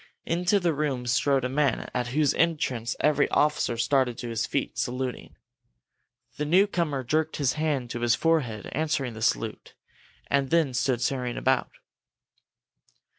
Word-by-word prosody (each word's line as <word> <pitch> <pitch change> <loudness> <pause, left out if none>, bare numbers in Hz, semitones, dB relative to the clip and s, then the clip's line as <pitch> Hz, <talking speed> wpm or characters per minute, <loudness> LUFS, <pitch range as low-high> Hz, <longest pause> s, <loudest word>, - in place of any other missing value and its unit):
Into 180 +4 +1
the 175 -3 +1
room 140 -4 -2
strode 130 +2 +2
a - - +2
man 140 +1 0
at 125 -1 -1
whose 145 +3 +2
entrance 130 -8 0
every 150 -1 +3
officer 150 -5 +1
started 125 0 +1
to 120 - -5
his 115 -1 -2
feet, 140 - -2
saluting. 125 0 -3 1.0
The 150 - -1
newcomer 170 -5 +2
jerked 155 +5 0
his 140 -3 +1
hand 145 -6 -1
to 120 - -4
his 120 -1 +3
forehead, 135 - 0
answering 140 -5 -1
the 110 - -9
salute, - - -1 0.5
and 140 -1 0
then 165 -6 +2
stood 120 0 0
staring 125 -1 -1
about. 130 0 +1
135 Hz, 145 wpm, -26 LUFS, 125-155 Hz, 1.0 s, every